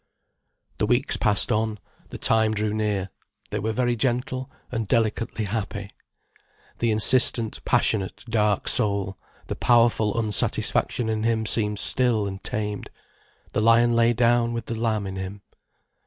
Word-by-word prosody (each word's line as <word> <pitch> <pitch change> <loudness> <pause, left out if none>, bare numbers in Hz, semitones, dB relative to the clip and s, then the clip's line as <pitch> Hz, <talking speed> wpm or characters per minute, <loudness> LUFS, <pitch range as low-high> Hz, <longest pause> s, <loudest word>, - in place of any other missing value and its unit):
The - - +1
weeks - - +1
passed 105 -2 +1
on, 110 0 0 0.3
the - - -7
time 110 -1 +2
drew 105 0 -1
near, 105 -3 -1 0.4
they 105 - -2
were 110 +3 -1
very 120 +1 0
gentle, 130 +2 -2 0.2
and 115 -3 -2
delicately 115 -1 0
happy. 100 -1 -4 0.9
The 115 - +1
insistent, 115 +1 +2
passionate, 100 0 0
dark 105 -3 +1
soul, 100 -4 0 0.3
the - - -4
powerful 115 -3 +3
unsatisfaction 110 +2 0
in 110 -1 -1
him 110 0 0
seemed 105 -1 +1
stilled 115 -3 +1
and 95 0 -8
tamed, 105 -1 -3 0.6
the - - 0
lion 115 +1 +4
lay 115 0 +4
down 120 0 +2
with 115 -1 -4
the 115 - -4
lamb 110 -2 -1
in 95 0 -5
him. 95 +1 -6
110 Hz, 140 wpm, -24 LUFS, 105-115 Hz, 0.9 s, lion